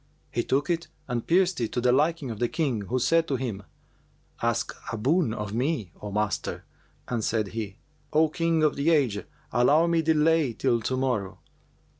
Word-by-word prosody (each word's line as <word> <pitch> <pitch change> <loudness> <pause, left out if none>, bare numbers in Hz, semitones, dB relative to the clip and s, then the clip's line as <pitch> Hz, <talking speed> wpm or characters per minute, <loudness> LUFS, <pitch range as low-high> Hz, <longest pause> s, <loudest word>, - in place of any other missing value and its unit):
He 120 - 0
took 140 +4 0
it 170 0 -1 0.2
and 120 -2 -3
pierced 180 -3 +3
it 115 - -1
to - - 0
the 125 0 +3
liking 150 0 +1
of 110 - -7
the 120 - +2
King 130 -7 -1
who 125 - +1
said 165 +6 +3
to 140 - 0
him, 120 -6 -3 0.8
'Ask 115 0 0 0.2
a 115 - -3
boon 140 - +2
of 105 -2 -4
me, 125 - -1
O 105 - -5
master'; 105 -2 -2 0.4
and 120 -3 -2
said 110 -2 0
he, 105 -3 -5 0.4
'O 155 +1 +4
King 165 0 +1
of 150 - +3
the 140 +4 +1
age, 130 -11 +2 0.3
allow 140 +8 +4
me 170 -1 +2
delay 160 -3 +3
till 120 0 +1
to 130 +3 -1
morrow.' 125 -8 -1
130 Hz, 185 wpm, -26 LUFS, 115-160 Hz, 0.8 s, O